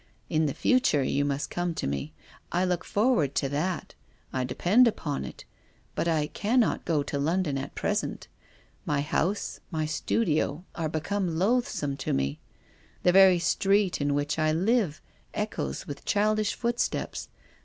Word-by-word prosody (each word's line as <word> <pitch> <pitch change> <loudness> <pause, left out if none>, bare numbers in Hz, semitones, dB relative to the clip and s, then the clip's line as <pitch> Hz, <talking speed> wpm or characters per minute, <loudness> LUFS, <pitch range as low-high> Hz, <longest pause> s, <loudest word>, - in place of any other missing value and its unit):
In 155 -1 +2
the 140 - -3
future 255 - +3
you 140 +2 +1
must 145 0 -2
come 175 -1 -1
to - - -3
me. 70 +2 -3 0.4
I 180 +2 +2
look 180 -2 0
forward 200 - +1
to 140 - +1
that, 160 +6 -2 0.4
I 130 - 0
depend 185 - +4
upon 150 -10 -2
it. - - -10 0.5
But - - -1
I 160 -3 +2
cannot 220 +9 +1
go 155 -4 +1
to 140 0 -3
London 160 0 0
at 135 +1 -5
present. - - -2 0.6
My 145 -1 0
house, 180 +7 -1
my 160 -3 -1
studio 155 0 0
are 160 -2 -2
become 165 +2 -1
loathsome 190 - 0
to 135 - -2
me. 70 +2 -1 0.6
The 180 - +5
very 190 -1 +7
street 195 +1 +2
in 145 0 +1
which 145 +2 -1
I 155 0 +3
live 185 0 +1 0.3
echoes 70 -1 -3
with 145 -1 -7
childish 215 0 +1
footsteps. 240 0 -2
160 Hz, 155 wpm, -28 LUFS, 145-195 Hz, 0.6 s, very